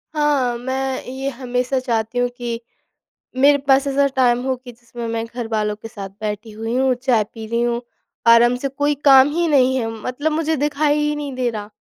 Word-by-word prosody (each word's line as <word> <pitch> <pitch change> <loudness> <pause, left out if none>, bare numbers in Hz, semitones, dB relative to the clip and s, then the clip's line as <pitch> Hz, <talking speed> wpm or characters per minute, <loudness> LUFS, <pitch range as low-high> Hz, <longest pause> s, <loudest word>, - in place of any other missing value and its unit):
हाँ, 285 -5 +1
मैं 260 +2 -3
ये 265 +2 -4
हमेशा 250 0 -2
चाहती 230 -2 -2
हूँ 245 0 +1
कि 235 -1 -4 0.8
मेरे 285 +2 +5
पास 270 +1 +4
ऐसा 280 +1 +2
टाइम 245 -2 +3
हो 265 -1 0
कि 250 0 -12
जिसमें 235 0 -8
मैं 225 0 -2
घरवालों 225 -3 -2
के 215 +2 -10
साथ 200 -3 -8
बैठी 215 +1 -4
हुई 225 +2 -4
हूँ, 260 0 +3
चाय 245 -3 +1
पी 220 +1 -10
रही 235 +1 -1
हूँ, 240 0 0 0.5
आराम 235 +1 +6
से, 275 +2 -3
कोई 290 +2 0
काम 270 0 +8
ही 340 +1 +1
नहीं 260 -3 +3
है 230 -3 -1
मतलब 290 +5 -2
मुझे 320 0 0
दिखाई 295 +1 +1
ही 295 0 0
नहीं 290 -2 -5
दे 250 -1 0
रहा। 210 -2 -6
250 Hz, 200 wpm, -20 LUFS, 230-275 Hz, 0.8 s, काम